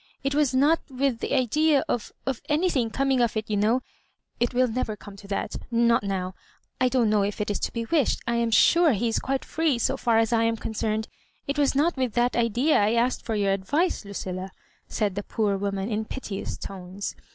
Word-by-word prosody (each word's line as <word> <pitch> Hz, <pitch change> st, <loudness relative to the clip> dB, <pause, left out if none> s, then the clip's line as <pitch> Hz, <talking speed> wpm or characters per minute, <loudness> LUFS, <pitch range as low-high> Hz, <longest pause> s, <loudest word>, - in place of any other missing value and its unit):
It 275 Hz, +1 st, 0 dB
was 285 Hz, -3 st, +2 dB
not 295 Hz, +5 st, +4 dB
with 265 Hz, -2 st, 0 dB
the -, -, -1 dB
idea 290 Hz, +4 st, +3 dB
of— 235 Hz, -, -2 dB
of 265 Hz, -3 st, -2 dB
anything 295 Hz, -6 st, +1 dB
coming 270 Hz, +1 st, +1 dB
of 235 Hz, -2 st, +1 dB
it, 215 Hz, -, -3 dB
you -, -, +2 dB
know; 220 Hz, +5 st, +2 dB, 0.6 s
it 240 Hz, -, +1 dB
will 255 Hz, +1 st, +3 dB
never 225 Hz, -2 st, -2 dB
come 205 Hz, -1 st, -12 dB
to 200 Hz, -, -12 dB
that 200 Hz, -, -3 dB
— -, -, -20 dB
not 235 Hz, 0 st, +3 dB
now; 190 Hz, -2 st, -3 dB, 0.3 s
— -, -, -37 dB
^I 255 Hz, -, +4 dB
don't 250 Hz, -3 st, +2 dB
know 210 Hz, -1 st, +3 dB
if 200 Hz, +2 st, -2 dB
it 210 Hz, 0 st, -1 dB
is 205 Hz, -, -2 dB
to -, -, -2 dB
be 230 Hz, -1 st, -3 dB
wished. 295 Hz, +1 st, +1 dB
I 235 Hz, 0 st, 0 dB
am 235 Hz, 0 st, +1 dB
sure 330 Hz, +7 st, +5 dB
he 230 Hz, +3 st, 0 dB
is 225 Hz, -, 0 dB
quite 270 Hz, 0 st, -2 dB
free 315 Hz, -5 st, +1 dB
so 235 Hz, -, 0 dB
&r 230 Hz, -1 st, +5 dB
as 225 Hz, +1 st, +2 dB
I 225 Hz, -, +3 dB
am 230 Hz, 0 st, +1 dB
concerned. 220 Hz, 0 st, -2 dB, 0.4 s
It 280 Hz, +1 st, -2 dB
was 280 Hz, -2 st, +2 dB
not 305 Hz, +3 st, +2 dB
with 255 Hz, -4 st, -1 dB
that 240 Hz, +1 st, +1 dB
idea 240 Hz, +6 st, +2 dB
I 210 Hz, +2 st, +2 dB
asked 240 Hz, +2 st, +1 dB
for 225 Hz, -, -2 dB
your 200 Hz, -2 st, +1 dB
advice, 290 Hz, -, 0 dB
Lucilla," 190 Hz, -2 st, -5 dB, 0.4 s
said 210 Hz, -3 st, -1 dB
the 205 Hz, -, -3 dB
poor 205 Hz, -1 st, -1 dB
woman, 195 Hz, 0 st, -2 dB
in 215 Hz, +1 st, -1 dB
piteous 215 Hz, -5 st, -5 dB
tones. 190 Hz, +1 st, -6 dB
230 Hz, 225 wpm, -26 LUFS, 205-265 Hz, 0.6 s, sure